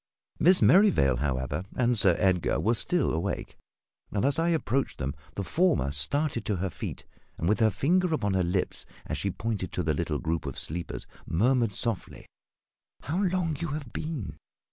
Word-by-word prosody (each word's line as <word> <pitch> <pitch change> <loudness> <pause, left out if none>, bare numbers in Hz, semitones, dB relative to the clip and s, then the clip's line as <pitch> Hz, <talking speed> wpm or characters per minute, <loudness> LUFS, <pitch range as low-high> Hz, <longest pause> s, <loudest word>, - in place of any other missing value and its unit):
Miss 185 +2 +6
Merrivale, 180 - +5
however, 65 +3 -2
and 125 -1 +2
Sir 95 -5 +5
Edgar 90 -4 +2
were 115 - +2
still 155 +6 +1
awake, 85 +5 -3 0.6
and 100 +2 0
as 140 +3 +2
I 165 +1 +2
approached 135 -5 0
them 70 0 -3 0.2
the 100 - -2
former 155 - +1
started 120 - 0
to 105 - 0
her 95 0 -2
feet - - -6 0.3
and, 85 - -2
with 105 +4 +2
her 110 -1 +5
finger 175 - +1
upon 105 -11 0
her 95 - +2
lips 90 +1 -1 0.2
as - - -3
she - - -1
pointed 105 -5 -3
to 90 - -1
the 80 -1 +1
little 75 0 -1
group 80 0 -2
of 70 - -5
sleepers, 85 +2 -4 0.2
murmured 120 +5 +2
softly 115 0 -2 0.8
"How 170 +7 -2
long 180 -4 0
you 170 - -2
have 150 -5 -5
been! 130 - -4
110 Hz, 175 wpm, -28 LUFS, -, 0.8 s, Miss